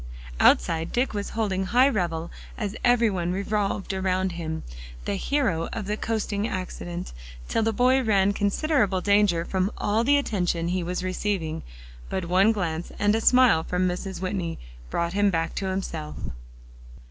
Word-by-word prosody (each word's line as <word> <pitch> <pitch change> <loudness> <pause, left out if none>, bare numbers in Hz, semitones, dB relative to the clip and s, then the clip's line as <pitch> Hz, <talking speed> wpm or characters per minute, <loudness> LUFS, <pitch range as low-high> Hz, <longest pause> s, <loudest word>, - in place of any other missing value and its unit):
Outside, 160 - +3
Dick 245 0 0
was 205 -1 -3
holding 190 -4 0
high 250 +7 +4
revel 170 -9 -1 0.3
as 210 -2 -3
every 240 -2 +4
one 175 -2 -1
revolved 200 0 -1
around 190 0 0
him, 160 -2 -4 0.4
the - - -1
hero 200 - 0
of 225 -3 -4
the 210 +2 -1
coasting 215 -1 -2
accident, 175 - -5 0.3
till - - 0
the 225 0 +2
boy 255 +4 +3
ran 200 -4 +3
considerable 205 -1 +1
danger 200 -4 +3
from 190 +1 0
all 215 +3 +1
the 285 +4 +4
attention 180 -10 -1
he 185 +1 0
was 180 +1 -3
receiving. 185 -4 -2 0.5
But 190 -2 -2
one 185 +5 +4
glance 175 -5 -3
and 205 0 +3
a 225 - +1
smile 250 -9 +5
from 180 +2 0
Mrs. 180 +1 -4
Whitney 185 -3 -3 0.3
brought 170 +1 -1
him 205 0 +3
back 165 -3 -1
to 195 - -1
himself. 165 -5 -4
190 Hz, 160 wpm, -25 LUFS, 175-215 Hz, 0.5 s, smile